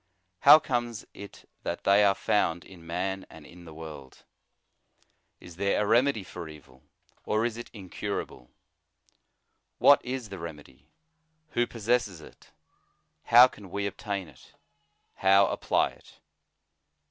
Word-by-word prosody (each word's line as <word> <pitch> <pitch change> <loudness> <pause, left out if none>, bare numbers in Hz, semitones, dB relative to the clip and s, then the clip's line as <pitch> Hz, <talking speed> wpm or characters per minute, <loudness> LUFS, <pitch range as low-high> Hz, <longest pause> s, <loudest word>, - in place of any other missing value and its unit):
How - - +9
comes 120 -6 -3
it 100 -1 -12
that - - -5
they 100 +1 +5
are 100 -1 +4
found 85 -4 0
in 85 -3 -15
man 95 +3 -3
and 80 -2 -14
in 85 +2 -15
the 80 - -11
world? 75 -5 -11 1.2
Is 85 -1 -13
there 100 +1 +1
a 105 - +1
remedy 115 0 +2
for 85 -3 -9
evil, 70 -4 -15 0.4
or 110 +2 0
is 120 -2 -2
it 120 - -9
incura 95 -5 -5
ble? 60 - -17 1.3
What 145 - +6
is 125 -3 -5
the 100 -2 -8
remedy? 80 -3 -11 0.6
who 120 -3 0
possesses 115 -5 -1
it? 80 - -16 0.8
how 120 +2 +8
can 105 -6 -14
we 100 +2 -3
obtain 100 -2 -4
it? - - -19 0.6
how 95 +1 +5
apply - - +1
it? - - -20
100 Hz, 135 wpm, -27 LUFS, 85-115 Hz, 1.3 s, How